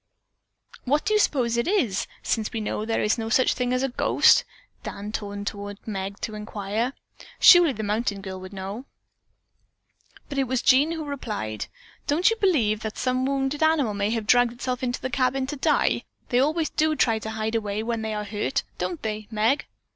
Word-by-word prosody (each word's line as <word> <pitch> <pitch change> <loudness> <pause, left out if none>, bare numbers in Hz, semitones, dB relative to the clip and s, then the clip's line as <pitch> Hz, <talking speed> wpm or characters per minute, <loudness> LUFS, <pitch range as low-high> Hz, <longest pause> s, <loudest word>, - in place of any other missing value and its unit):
"What 290 +4 +1
do 430 - +1
you 425 - +4
suppose 240 - +1
it 235 - 0
is, 265 - +1 0.2
since 220 -2 -1
we 225 - -3
know 210 0 -3
there 225 0 0
is 210 +3 +1
no 225 0 -3
such 255 +2 +3
thing 250 -1 -1
as 255 +1 +1
a 270 - +1
ghost?" 245 - +4 0.4
Dan 205 +1 -6
turned 205 -1 -5
toward 205 -1 -5
Meg 200 -1 -4
to 215 - -4
inquire. 210 +3 -3 0.5
Surely 350 -4 +8
the 220 -4 -5
mountain 210 0 -1
girl 190 -1 -7
would 185 +1 -9
know. 200 +5 -6 1.4
But 280 -1 -3
it 270 - +2
was 255 0 -1
Jean 285 +5 +4
who 320 -2 -4
replied: 210 - -4 0.4
"Don't 340 +9 +3
you - - +1
believe 255 - +2
that 220 -1 -5
some 255 0 0
wounded 275 +1 -1
animal 315 -8 +3
may 200 0 0
have 225 -1 -2
dragged 245 +1 +4
itself 250 +1 -3
into 245 -1 -2
the 260 - -3
cabin 260 0 +1
to 290 +3 -4
die? 300 +2 +1 0.2
They 245 - +3
always 310 +4 +1
do 310 0 +1
try 225 -5 +2
to 220 - -6
hide 220 0 -3
away 210 -1 -1
when 230 0 -2
they 220 -1 -3
are 210 - -2
hurt, 210 +6 -2 0.2
don't 340 -4 -3
they, 215 -1 -4
Meg?" 225 +5 +1
235 Hz, 195 wpm, -25 LUFS, 210-270 Hz, 1.4 s, Surely